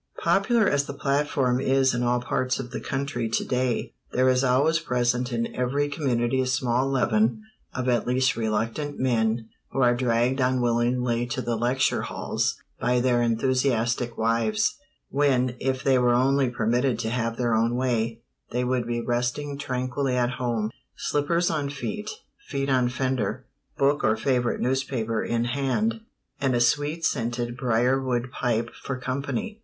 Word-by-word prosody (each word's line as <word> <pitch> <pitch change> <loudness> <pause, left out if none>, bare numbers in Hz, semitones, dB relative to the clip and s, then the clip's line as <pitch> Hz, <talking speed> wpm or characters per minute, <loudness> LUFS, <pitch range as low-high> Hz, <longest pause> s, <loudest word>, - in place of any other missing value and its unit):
Popular 215 +2 +3
as 145 -1 +2
the 140 - -6
platform 140 -3 +1
is 135 0 +3
in 120 - -1
all 120 0 +2
parts 125 +1 -1
of 125 -2 -6
the - - -4
country 135 -4 -2
to 115 - 0
day, 125 -2 -1 0.2
there 130 +1 +2
is 130 +1 +3
always 140 +6 +3
present 125 -3 0
in 115 -1 -2
every 135 +4 0
community 130 -4 0
a 130 - -1
small 130 0 +1
leaven 120 - +1 0.3
of 130 0 -2
at 120 -2 +1
least 130 +2 +2
reluctant 115 +6 -2
men 115 -3 +1 0.2
who - - -4
are 120 0 +5
dragged 120 +1 +1
unwillingly 120 -1 +1
to 130 +2 -3
the 120 -2 -1
lecture 125 +3 +1
halls - - -2 0.2
by 125 0 +2
their 120 -1 +2
enthusiastic 120 0 +1
wives, 115 - +1 0.3
when, 130 -3 +2
if 130 0 -1
they 130 -2 +4
were 120 -1 +3
only 135 +1 +3
permitted 120 +1 +1
to 110 -1 -2
have 115 -1 -1
their 120 -2 +1
own 115 +2 +2
way, 115 -3 -1 0.3
they 125 +1 -1
would 125 -1 0
be 120 0 -1
resting 125 +4 -1
tranquilly 130 -1 -2
at 120 0 +1
home, 120 -4 -2 0.2
slippers 170 +4 0
on 145 -3 -1
feet, 210 +10 -4 0.4
feet 135 0 -1
on 125 -2 +3
fender, 130 -2 -2 0.3
book 140 +1 +2
or 110 0 +3
favorite 125 0 0
newspaper 125 -4 -1
in 115 0 0
hand, 140 - 0 0.4
and 135 -3 +1
a - - +2
sweet 145 +6 +1
scented 120 -1 -1
briarwood 125 0 +1
pipe 115 -2 -1
for 135 - -5
company. 140 - -3
125 Hz, 160 wpm, -25 LUFS, 120-135 Hz, 0.4 s, are